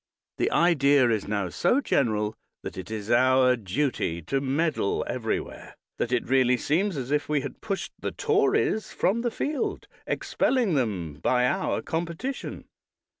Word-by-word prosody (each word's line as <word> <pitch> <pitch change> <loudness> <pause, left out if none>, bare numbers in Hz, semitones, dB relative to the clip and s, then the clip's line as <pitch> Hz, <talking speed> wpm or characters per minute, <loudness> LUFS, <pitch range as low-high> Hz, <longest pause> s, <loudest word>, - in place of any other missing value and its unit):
The - - +2
idea 140 -7 +4
is 110 -3 -1
now 100 -3 -1
so 175 - +2
general 110 - +1 0.3
that - - -6
it 95 - -7
is 110 0 -4
our 130 +1 +5
duty 115 - -1
to 135 - -1
meddle 140 -4 0
everywhere, - - -4 0.2
that 120 - -1
it 125 -2 0
really 125 -1 +3
seems 170 - 0
as 130 0 -4
if 150 0 0
we 150 -2 +1
had - - -7
pushed 200 -3 -3
the - - -2
Tories 415 - +1
from 225 +5 +1
the 240 - 0
field, 285 +5 -3 0.2
expelling 245 -9 +1
them 95 - -2
by 125 +5 +2
our 190 +9 0
competition. 170 +11 -4
135 Hz, 150 wpm, -26 LUFS, 115-175 Hz, 0.3 s, our